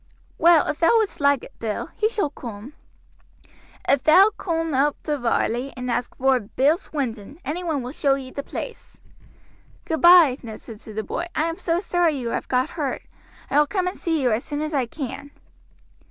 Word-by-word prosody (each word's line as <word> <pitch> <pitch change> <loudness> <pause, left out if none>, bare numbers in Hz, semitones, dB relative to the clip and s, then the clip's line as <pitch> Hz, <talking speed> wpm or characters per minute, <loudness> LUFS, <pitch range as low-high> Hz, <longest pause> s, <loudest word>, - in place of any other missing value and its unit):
"Well, 335 -2 +6
if 300 - -3
thou 345 +8 +5
would'st 435 -8 -1
like 280 -2 +3
it, - - -14
Bill, 220 -2 -4
he 435 - +1
shall 405 -10 -1
coom." 235 0 -9 1.1
"If 275 -2 +3
thou 380 +7 +6
coom 330 -3 -2
oop 280 +2 +2
to 295 -2 -2
Varley 245 +2 0
and 250 0 -3
ask 240 +1 -2
vor 265 -1 +3
Bill 265 +8 +2
Swinton, 255 - -5
anyone 315 -3 -2
will 250 - -5
show 275 -2 +1
ee 260 -1 -8
the 280 - -4
place." - - -8 0.9
"Goodby," 325 -4 +6
Ned 220 -3 -8
said 220 -3 -11
to 220 - -11
the 220 - -2
boy, 345 - -4
"I 310 - +1
am 330 +1 -3
so 335 0 0
sorry 350 -4 +1
you 240 -3 -3
have - - -3
got 255 0 0
hurt. 290 -5 -3 0.5
I 290 - +4
will 295 - +4
come 375 0 -1
and 365 - -2
see 325 -2 -1
you 255 -4 +2
as 220 +3 0
soon 295 -1 -4
as 310 +1 -4
I 265 -4 +1
can." 275 +2 -6
285 Hz, 195 wpm, -23 LUFS, 250-330 Hz, 1.1 s, Well